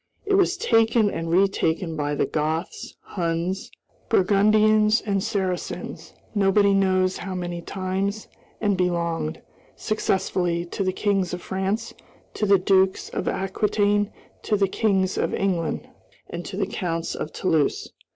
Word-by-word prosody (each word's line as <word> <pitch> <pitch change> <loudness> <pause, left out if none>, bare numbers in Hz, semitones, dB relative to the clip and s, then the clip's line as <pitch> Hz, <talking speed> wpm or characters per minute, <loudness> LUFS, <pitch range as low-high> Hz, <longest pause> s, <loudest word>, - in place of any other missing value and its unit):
It 405 - 0
was 385 -1 +3
taken 225 - +3
and 165 0 -4
retaken 170 -2 +1
by 145 -1 -1
the - - +1
Goths, 155 +2 -3
Huns, 175 +1 -2 0.4
Burgundians, 215 +3 +4
and 200 -3 -1
Saracens, 190 -5 -3 0.2
nobody 200 0 +4
knows 185 -1 +2
how 190 -1 -5
many 175 -1 -4
times, 195 +3 -3 0.3
and 205 -2 +1
belonged, 170 - -1 0.3
successively, 180 -4 -1
to 185 +3 -3
the 185 - +1
kings 190 -2 0
of 180 - -10
France, 195 +4 -2 0.4
to 210 - -1
the 200 0 +6
dukes 190 0 +2
of - - -4
Aquitaine, 205 +1 +1 0.3
to 210 - 0
the 195 -1 +3
kings 190 -2 +1
of - - 0
England, 180 -4 -1 0.4
and - - -5
to - - -6
the - - +1
counts 165 -3 -3
of 155 - -5
Toulouse. 160 -6 0
190 Hz, 135 wpm, -24 LUFS, 175-205 Hz, 0.4 s, the